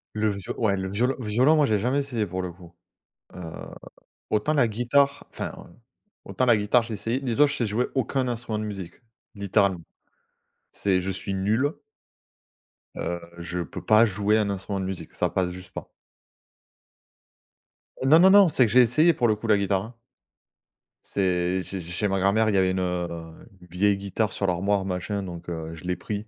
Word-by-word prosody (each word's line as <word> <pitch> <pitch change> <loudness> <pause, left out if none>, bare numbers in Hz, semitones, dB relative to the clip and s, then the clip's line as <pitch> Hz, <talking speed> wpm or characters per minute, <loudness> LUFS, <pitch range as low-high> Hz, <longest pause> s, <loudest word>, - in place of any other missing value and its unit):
Le 110 0 +1
vio 100 -2 -4
ouais, 105 -4 +2
le 95 0 -3
violo 120 +7 0
violon, 125 +8 +3
moi, 150 - +4
j'ai 105 -5 +1
jamais 130 +6 +1
essayé 125 -6 -2
pour 95 0 -4
le 90 - -4
coup. 85 -1 -16 0.6
Heu, - - -9 0.9
autant 110 +9 +1
la 135 -6 +3
guitare 125 +6 +1
enfin, - - -5
heu, 85 - -14 0.5
autant 130 - -1
la 120 -3 +5
guitare, 105 +4 +2
j'ai 115 -1 -6
essayé, 115 +5 -2
dis-toi, 135 +2 +3
je 140 - -3
sais 115 - -1
jouer 115 +5 0
aucun 130 +1 0
instrument 115 -3 -3
de - - -3
musique, 95 -5 -7 0.4
littéralement. 100 -3 +1 0.9
C'est 95 -2 +1
je 95 +2 -3
suis 95 +1 -4
nul. 110 +10 +1 1.2
Heu, 85 0 -3 0.2
je 85 +1 -5
peux 85 -5 -6
pas 110 +2 +6
jouer 105 +1 +1
un 105 -2 +1
instrument 100 0 -3
de 95 - -3
musique, 95 -2 -6
ça - - 0
passe 90 -1 -1
juste 90 0 -11
pas. - - -8 2.1
Heu, 130 - 0
non, 155 +4 +7
non, 190 +2 +7
non, 200 -1 +7
c'est 130 -5 +4
que - - -5
j'ai 125 +2 +7
essayé, 155 +9 +5
pour 120 -5 +1
le 110 - +2
coup, 115 +2 -7
la 105 - +4
guitare, 100 -1 0
hein. 115 +3 -11 1.1
C'est 90 -1 0
c'est 95 0 -5
ch 85 0 -8
chez 105 - 0
ma 95 -1 0
grand-mère, 110 +3 +2
il 100 - 0
y - - +4
a 95 -1 +3
une, 95 0 -1
heu, 85 -2 -3 0.4
vieille 100 +3 +2
guitare 100 +1 -2
sur 100 - -1
l'armoire, 95 +3 +1
machin, 95 +2 -3
donc, 85 -2 -8
heu, 80 -1 -5
je 80 - -13
l'ai 90 - -1
pris. 105 +3 -5
100 Hz, 195 wpm, -25 LUFS, 95-120 Hz, 2.1 s, non